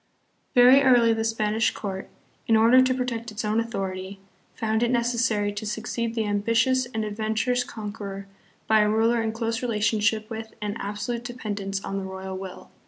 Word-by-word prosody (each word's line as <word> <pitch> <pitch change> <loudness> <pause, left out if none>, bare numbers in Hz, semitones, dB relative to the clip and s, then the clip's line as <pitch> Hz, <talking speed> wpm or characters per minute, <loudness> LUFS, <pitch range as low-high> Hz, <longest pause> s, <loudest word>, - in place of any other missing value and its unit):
Very 250 +2 +8
early 245 -4 +5
the 225 0 -1
Spanish 220 0 +1
court,. 190 -2 -5 0.4
in 225 - +4
order 230 +4 +6
to 255 0 +2
protect 240 -2 -3
its 215 +1 -5
own 215 +1 +1
authority, 195 -4 -4 0.4
found 220 -1 0
it 240 - +2
necessary 235 -4 +1
to 205 - -5
succeed 225 +2 -3
the 225 -2 0
ambitious 230 +5 +1
and 220 -2 -2
adventurous 220 +4 0
conqueror 205 -4 -7 0.4
by 220 0 +4
a 210 0 +3
ruler 225 +2 +2
in 225 0 -1
close 225 +1 -2
relationship 215 -2 +1
with 220 -1 -7
and 210 0 -3
absolute 210 +4 -4
dependence 205 -5 -4
on 195 - -3
the - - -5
royal 190 0 -6
will. 190 -1 -9
220 Hz, 170 wpm, -25 LUFS, 205-235 Hz, 0.4 s, Very